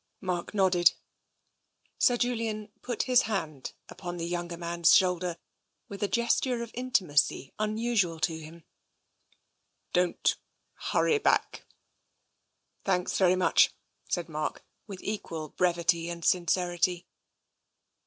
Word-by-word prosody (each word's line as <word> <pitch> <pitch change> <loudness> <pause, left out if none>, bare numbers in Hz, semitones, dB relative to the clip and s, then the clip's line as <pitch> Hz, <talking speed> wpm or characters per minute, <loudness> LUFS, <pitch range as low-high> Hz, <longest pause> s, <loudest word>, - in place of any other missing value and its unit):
Mark 180 0 -3
nodded. 180 -3 +4 1.1
Sir 245 - +4
Julian 225 -3 -2
put 240 -2 -2
his 250 -1 +4
hand 155 -10 -3
upon 175 -1 -7
the 165 - -3
younger 175 0 -3
man's 170 0 +3
shoulder 180 -2 +2 0.5
with 200 - -8
a 205 - +2
gesture 235 +2 +1
of 230 - -9
intimacy 185 - +1
unusual 215 -5 0
to 160 0 +1
him. 160 +1 -12 0.7
" - - -42
Don't 180 0 +1 0.5
hurry 445 - +2
back." - - 0 0.6
" - - -48
Thanks 180 -2 0
very 185 -1 +4
much," 185 - +4 0.4
said 175 -1 -1
Mark, 155 -2 -4 0.2
with 195 -3 -9
equal 165 -7 -4
brevity 170 -1 +1
and 170 -1 -6
sincerity. 175 0 +1
180 Hz, 115 wpm, -29 LUFS, 170-215 Hz, 1.1 s, nodded